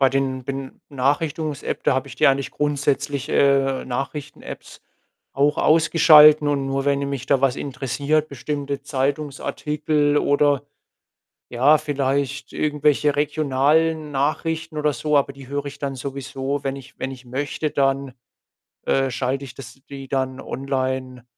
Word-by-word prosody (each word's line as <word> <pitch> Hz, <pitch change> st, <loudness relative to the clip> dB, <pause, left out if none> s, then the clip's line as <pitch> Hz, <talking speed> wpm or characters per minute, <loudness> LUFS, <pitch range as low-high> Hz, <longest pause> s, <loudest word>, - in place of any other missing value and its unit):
Bei 135 Hz, -1 st, +5 dB
den 135 Hz, -1 st, -1 dB
Benachrichtungs-App, 140 Hz, +3 st, -3 dB
da -, -, +2 dB
habe 130 Hz, +1 st, -1 dB
ich 125 Hz, -, -11 dB
die -, -, +4 dB
eigentlich 135 Hz, 0 st, +2 dB
grundsätzlich 145 Hz, -1 st, -1 dB
äh, 135 Hz, -1 st, +2 dB
Nachrichten-Apps 140 Hz, +3 st, -6 dB, 0.5 s
auch 145 Hz, +2 st, +2 dB
ausgeschalten 155 Hz, -2 st, +6 dB
und 140 Hz, -2 st, 0 dB
nur 135 Hz, 0 st, -1 dB
wenn 140 Hz, 0 st, +1 dB
mich 140 Hz, -2 st, -4 dB
da 140 Hz, -1 st, +2 dB
was 135 Hz, -2 st, +2 dB
interessiert, 145 Hz, +3 st, -1 dB
bestimmte 140 Hz, +1 st, -4 dB
Zeitungsartikel 145 Hz, +1 st, -1 dB
oder 145 Hz, -1 st, +2 dB, 0.9 s
ja, 135 Hz, +6 st, +4 dB
vielleicht 140 Hz, -1 st, -2 dB
irgendwelche 150 Hz, -1 st, +1 dB
regionalen 150 Hz, +2 st, +1 dB
Nachrichten 155 Hz, +3 st, -2 dB
oder 150 Hz, 0 st, +1 dB
so 150 Hz, +2 st, -1 dB
aber 140 Hz, 0 st, 0 dB
die 135 Hz, -1 st, -13 dB
höre 145 Hz, +1 st, -3 dB
ich 140 Hz, 0 st, -8 dB
dann 140 Hz, -1 st, -3 dB
sowieso, 135 Hz, +1 st, -4 dB
wenn 135 Hz, 0 st, -2 dB
ich 135 Hz, -1 st, -12 dB
wenn 130 Hz, -, -3 dB
ich 130 Hz, -1 st, -11 dB
möchte, 140 Hz, +4 st, -3 dB
dann, 135 Hz, -1 st, 0 dB, 0.7 s
äh, 135 Hz, -1 st, +2 dB
schalte 130 Hz, +2 st, -2 dB
ich 130 Hz, -2 st, -10 dB
das 135 Hz, 0 st, -11 dB
die 135 Hz, -1 st, -8 dB
dann 130 Hz, -1 st, -2 dB
online 130 Hz, -2 st, -3 dB
140 Hz, 140 wpm, -22 LUFS, 135-150 Hz, 0.9 s, ausgeschalten